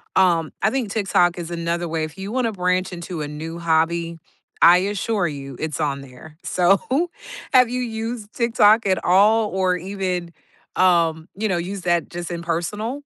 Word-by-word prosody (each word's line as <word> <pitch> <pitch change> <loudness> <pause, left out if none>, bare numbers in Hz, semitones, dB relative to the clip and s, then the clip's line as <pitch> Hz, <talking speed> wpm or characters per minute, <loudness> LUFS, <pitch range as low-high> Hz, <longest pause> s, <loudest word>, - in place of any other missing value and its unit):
um, 170 -4 +3
I 195 - +3
think 255 -6 -2
TikTok 185 -4 +2
is 170 -1 -6
another 170 0 -2
way 160 -1 -1
if 155 +2 -11
you 195 +2 -6
wanna 250 -2 0
branch 180 0 0
into 170 -2 -6
a 145 - -3
new 160 +3 -7
hobby, 165 0 0 0.4
I 175 +1 +8
assure 200 0 -1
you 140 -3 -7
it's 160 0 -3
on 140 -2 -1
there. 140 +4 -14
So, 185 +2 +3 0.7
have 255 -2 +6
you 250 +1 -2
used 225 -1 -5
TikTok 230 -2 +4
at 185 - +1
all 210 +4 +4
or 185 -1 +1
even, 185 -2 -3 0.5
um, 170 -3 +3
you 215 +3 -1
know, 180 - +1
use 185 +3 -4
that 175 -1 +1
just 175 0 -6
in 170 - -4
personal? 210 +9 -2
180 Hz, 175 wpm, -22 LUFS, 165-205 Hz, 0.7 s, I